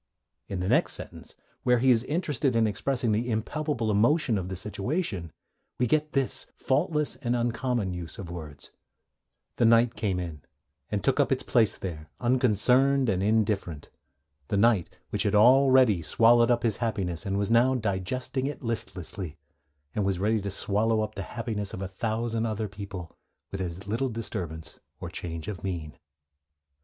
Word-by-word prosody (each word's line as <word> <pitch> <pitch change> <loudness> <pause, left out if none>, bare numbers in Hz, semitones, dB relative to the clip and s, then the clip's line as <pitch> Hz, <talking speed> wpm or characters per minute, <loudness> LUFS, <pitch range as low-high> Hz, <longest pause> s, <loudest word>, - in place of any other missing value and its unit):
In 95 -2 -4
the 90 - -1
next - - +3
sentence, - - -7 0.3
where 125 -1 +3
he 130 +2 +4
is 115 -2 +3
interested 145 -5 0
in 115 -1 +4
expressing 120 +3 -1
the 115 +4 0
impalpable 120 +1 -1
emotion 120 +5 +3
of 95 -2 -3
the 95 - -4
situation, 100 - -2 0.5
we 125 - +2
get 150 +4 +1
this 135 -2 +1
faultless 150 +2 0
and 120 -3 -1
uncommon 120 -4 -1
use 85 -1 -6
of 90 -4 -7
words: 75 -4 -9 0.9
'The 120 - +3
night 115 +1 +5
came 95 -4 -1
in, 85 -4 -6 0.5
and - - -2
took - - +2
up - - +3
its - - +1
place 110 -3 +2
there, 80 -4 -6
unconcerned 125 +2 +3
and 95 -2 +1
indifferent; 100 -7 0 0.6
the 100 - 0
night 105 -4 +2
which - - 0
had 105 0 +2
already 130 -3 +6
swallowed 115 +7 +4
up 120 -1 +2
his 115 -3 +1
happiness, 95 -8 -2
and 100 0 -1
was 100 +2 0
now 125 +3 +4
digesting 125 +5 -2
it 145 -1 -6
listlessly; 95 -6 -4 0.6
and 105 - 0
was 95 -2 0
ready 105 +3 +1
to 100 - -3
swallow 110 +3 +1
up 110 0 -3
the 100 - -5
happiness 110 -1 -4
of 95 - -7
a - - -3
thousand 115 +3 -2
other 110 0 -2
people 95 -4 -8 0.4
with 95 - -4
as 90 +2 -5
little 115 +6 0
disturbance 85 -8 -5 0.2
or - - -6
change 85 -1 -5
of 105 -4 -6
mien.' 85 -6 -4
110 Hz, 165 wpm, -27 LUFS, 95-120 Hz, 0.9 s, already